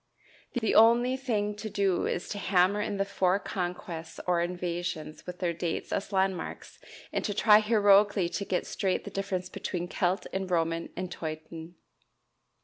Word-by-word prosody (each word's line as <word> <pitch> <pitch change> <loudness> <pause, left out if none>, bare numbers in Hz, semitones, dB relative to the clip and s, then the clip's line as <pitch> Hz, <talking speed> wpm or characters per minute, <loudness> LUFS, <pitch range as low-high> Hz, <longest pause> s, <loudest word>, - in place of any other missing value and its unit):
The 220 -3 0
only 235 +3 +6
thing 215 -6 -1
to 215 +1 -5
do 195 -3 +1
is 175 - -2
to 205 - -4
hammer 190 +1 +3
in 205 -1 -2
the 195 - +1
four 190 -1 +2
conquests 175 -4 -5
or 175 -1 +2
invasions 175 -3 -4
with 180 0 -6
their 175 -2 -1
dates 170 0 -3
as 195 - -2
landmarks, 190 -1 -2 0.3
and - - -1
to 205 - -2
try 210 0 +7
heroically 205 -3 +4
to 200 - -3
get 185 -2 -1
straight 190 -2 -1
the - - -8
difference 195 -2 -2
between 175 -1 -4
Celt 185 +1 0
and 190 -1 -2
Roman 165 -1 0
and 185 0 -4
Teuton. 160 +1 -7
185 Hz, 160 wpm, -29 LUFS, 175-205 Hz, 0.3 s, try